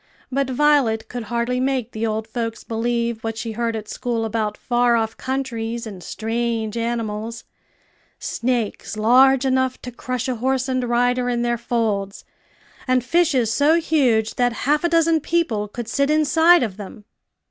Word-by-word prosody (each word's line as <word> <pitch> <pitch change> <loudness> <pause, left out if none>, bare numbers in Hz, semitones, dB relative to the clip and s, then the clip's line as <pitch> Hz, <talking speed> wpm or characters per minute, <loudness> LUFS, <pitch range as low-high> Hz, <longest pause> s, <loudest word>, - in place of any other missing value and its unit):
But 275 0 0
Violet 255 -5 +2
could 245 -2 -5
hardly 235 +3 -1
make 255 -3 -1
the 220 +1 -2
old 220 0 -2
folks 230 0 -4
believe 235 0 -2
what 225 0 -3
she 225 0 -4
heard 230 +1 -2
at 215 -1 -6
school 230 -1 -2
about 215 -1 -2
far 240 -1 +2
off 225 -1 -1
countries 235 -3 -3
and 200 -4 -8
strange 225 +1 -2
animals 230 -1 -3 0.7
snakes 235 -3 -2
large 260 +4 +5
enough 260 -1 +1
to 250 - -6
crush 255 +1 -4
a 255 -2 -2
horse 260 +2 0
and 255 -1 0
rider 245 +1 +1
in 240 -1 0
their 240 0 +1
folds, 215 -5 -2 0.6
and 255 -1 +2
fishes 260 -7 +2
so 295 +5 +4
huge 255 -10 +1
that 245 -1 +2
half 295 +3 +2
a 345 - +2
dozen 330 -1 +3
people 285 -11 0
could 230 +2 -7
sit 280 +4 0
inside 310 +2 +5
of 205 -5 -4
them. 205 0 -10
240 Hz, 160 wpm, -21 LUFS, 225-260 Hz, 0.7 s, large